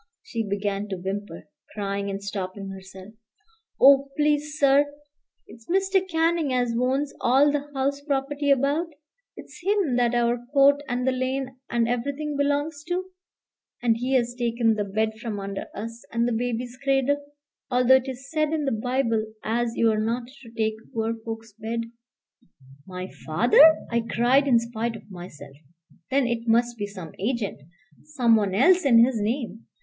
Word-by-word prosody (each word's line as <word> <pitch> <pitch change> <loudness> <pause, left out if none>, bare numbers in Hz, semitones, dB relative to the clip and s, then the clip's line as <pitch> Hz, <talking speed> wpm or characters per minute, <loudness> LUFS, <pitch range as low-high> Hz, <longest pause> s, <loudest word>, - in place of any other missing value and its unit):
She 230 - -4
began 200 -1 -2
to 195 - -3
whimper, 190 -3 -6 0.3
crying 200 -1 -2
and 195 0 -5
stopping 195 -1 -5
herself. 190 +1 -11 0.7
"Oh, 275 0 +6
please, 300 0 +1
sir! 285 0 +4 0.5
it's 225 +3 -16
Mr. 385 +1 +2
Canning 325 -3 +1
as 245 -2 +1
owns 265 +4 0
all 275 +4 +4
the 290 0 -3
house 280 +1 -1
property 285 0 -1
about; 280 +5 +2 0.5
it's - - -12
him 380 -9 +1
that 240 -1 +2
our 240 0 +1
court 280 0 +5
and 250 0 -2
the - - +4
lane 260 0 -2
and 235 -1 +1
everything 280 +5 -2
belongs 285 +1 -1
to. 365 +2 -3 0.7
And 230 -2 +3
he's 245 -1 0
taken 235 -2 +1
the 210 -1 -2
bed 220 +2 -1
from 220 -4 -4
under 195 0 -5
us, 230 +3 -7
and 235 +1 +1
the 240 - 0
baby's 245 +1 -3
cradle, 275 +1 +1 0.5
although 250 +1 +5
it's 265 +1 -8
said 310 -1 0
in 305 -2 -1
the 270 - 0
Bible 230 0 0 0.2
as 235 +1 -1
you're 220 -2 +2
not 235 +2 -1 0.2
to 235 - -13
take 220 -1 -1 0.2
poor 225 0 0
folks' 225 -1 -8
bed." 225 +2 -4 1.1
"My 185 0 -6 0.2
father!" 245 - +6
I 235 0 +2
cried 245 +5 +2
in 245 -3 +5
spite 230 0 -2
of 215 - -13
myself; 150 -6 -10 0.5
"then 270 0 +2
it 235 -1 -2
must 240 +1 +2
be 205 -2 -4
some 185 -6 -9
agent, 210 - -2 0.4
some 250 -7 +2
one 200 -3 0
else 360 - +5
in 235 -4 +6
his 245 -4 -2
name. 225 0 -3
240 Hz, 160 wpm, -25 LUFS, 220-275 Hz, 1.1 s, Oh